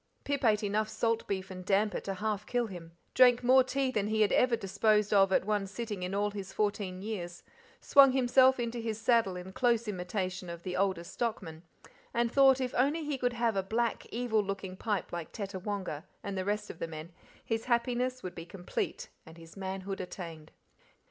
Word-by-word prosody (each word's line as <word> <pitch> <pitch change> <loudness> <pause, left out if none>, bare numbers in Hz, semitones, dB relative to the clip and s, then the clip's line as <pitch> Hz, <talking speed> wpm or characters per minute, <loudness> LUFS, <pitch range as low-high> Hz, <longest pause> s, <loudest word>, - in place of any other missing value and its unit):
Pip 285 -1 -2
ate 215 -2 +3
enough 210 +1 0
salt 230 0 -1
beef 190 -1 -3
and 185 0 -7
damper 205 +3 +1
to 195 - -4
half 210 +1 -2
kill 245 -1 0
him, 175 -5 -9 0.2
drank 245 -1 +6
more 260 +1 +6
tea 265 0 -1
than 210 -4 0
he 220 0 +1
had 210 - +4
ever 250 -1 +4
disposed 210 +1 +1
of 195 -1 +5
at 190 - +2
one 205 -2 0
sitting 210 -1 -5
in 180 +2 -3
all 205 +1 +1
his 200 -2 -6
fourteen 200 -3 -2
years, 175 -5 -5 0.4
swung 275 -1 +7
himself 260 0 +4
into 235 0 -2
his 225 -2 -3
saddle 225 -4 +2
in 180 +1 -8
close 235 -1 +2
imitation 185 -1 -3
of 170 0 -7
the 180 -1 -4
oldest 185 -3 -1
stockman, 195 -9 -3 0.5
and 235 0 +1
thought 270 -1 +6
if 255 -2 -1
he - - -5
only 295 +3 +1
could 245 -1 0
have 235 -2 0
a 195 - +2
black, 225 +4 -1
evil 230 -2 +1
looking 195 -1 -5
pipe 205 -1 -2
like 170 -2 -5
Tettawonga 195 -5 -4 0.2
and 200 - -4
the 185 -1 -2
rest 210 +1 -2
of - - -15
the 165 - -3
men 160 +1 -8 0.3
his 225 -1 -2
happiness 250 +1 0
would 185 - -5
be 165 - -7
complete 180 0 -4 0.2
and 160 +1 -13
his 165 0 -14
manhood 195 0 -4
attained. 165 -4 -8
210 Hz, 195 wpm, -31 LUFS, 185-235 Hz, 0.5 s, swung